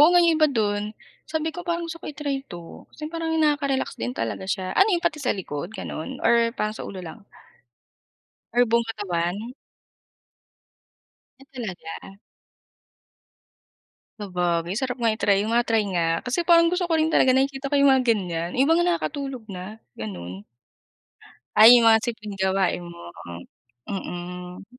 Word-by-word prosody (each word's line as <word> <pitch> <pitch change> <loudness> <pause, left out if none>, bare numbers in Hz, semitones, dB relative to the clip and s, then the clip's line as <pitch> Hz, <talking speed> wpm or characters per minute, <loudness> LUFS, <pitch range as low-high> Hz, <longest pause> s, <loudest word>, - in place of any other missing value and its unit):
o 300 - +9
nga 355 - +6
yung 335 -1 +4
iba 310 - +6
do'n, 210 -5 0 0.4
sabi 315 0 -2
ko, 355 - -6
"Parang 340 0 -1
gusto 330 - -5
ko - - -10
i-try 285 -2 -3
'to" 170 -2 -10
kasi 305 - -8
parang 330 -1 -2
nakaka-relax 285 -3 +1
din 115 +2 -2
talaga 115 +11 -3
siya. 190 -1 -2
Ano 390 - +6
yun 345 - +2
pati 335 -3 +1
sa 260 - +1
likod 170 0 -5
gano'n 155 - -6
or 235 0 +4
parang 215 +1 -2
sa - - -6
ulo 190 - -7
lang? 170 +7 -9 1.4
Or 245 - +6
buong 235 0 +2
katawan? 200 +3 -3 1.9
Ah, - - -14
talaga? 195 -6 -7 2.1
Sabagay, 180 -1 -1
sarap 255 -1 -2
nga 230 - +4
i-try, 205 -2 +2
ma-try 230 0 +2
nga 165 -2 0
kasi 325 +8 -2
parang 335 -1 +6
gusto 360 0 0
ko 335 - 0
rin 315 0 +2
talaga 260 -4 +4
nakikita 270 +1 0
ko 280 - -2
yung 280 -1 +5
mga 260 -1 +3
ganiyan. 170 -4 -3
Iba 295 +6 +4
nga 345 - +2
nakakatulog 280 -7 -2
na 195 +4 -8 0.2
gano'n. 95 -2 -7 1.1
Ay, 230 +3 +10
yung 230 - +3
mga 225 -1 +6
simpleng 215 -4 -5
gawain 190 -1 0
mo, 170 - -10 0.7
hmm, 195 -2 -3 0.6
mm. - - -11
230 Hz, 155 wpm, -24 LUFS, 185-285 Hz, 2.1 s, Ay